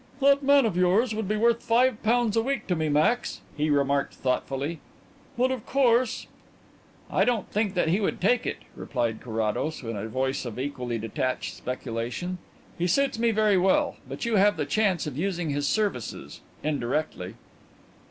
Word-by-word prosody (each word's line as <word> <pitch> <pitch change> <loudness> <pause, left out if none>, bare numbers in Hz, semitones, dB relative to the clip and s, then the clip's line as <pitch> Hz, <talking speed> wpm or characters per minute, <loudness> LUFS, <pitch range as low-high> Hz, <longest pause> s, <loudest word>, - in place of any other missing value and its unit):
"That 280 0 +5
man 280 -1 +5
of 210 -6 0
yours 190 +6 +3
would 215 -2 -3
be 215 +2 0
worth 235 +1 +3
five 240 0 +2
pounds 230 -1 +2
a 225 - +4
week 265 0 -2
to 180 - 0
me, 160 -1 -1
Max," 155 +12 +1
he 150 +1 0
remarked 140 -1 +1
thoughtfully. 135 +4 -2 0.6
"But, 255 +2 +2
of 255 -4 -3
course 250 -3 +2 0.4
" - - -27
"I - - +3
don't 240 -5 0
think 210 -2 0
that 175 -3 +2
he 185 +5 +2
would 205 - -1
take 225 +6 +2
it," - - -4
replied 120 -4 -2
Carrados, 115 +6 -2
in 115 -1 -4
a 105 +2 -4
voice 130 +4 -1
of 120 -3 -6
equally 125 -3 -3
detached 110 -3 -2
speculation. 125 - -4 0.4
"He 175 - +1
suits 270 +6 +1
me 235 0 +3
very 215 -3 +3
well. 185 +1 +2
But - - -5
you 230 -2 +2
have 205 +2 +4
the - - -1
chance 200 -6 +1
of 150 -2 -5
using 175 -4 -1
his 145 0 -1
services 205 - -2 0.2
indirectly." 135 -8 -2
180 Hz, 175 wpm, -26 LUFS, -, 0.6 s, That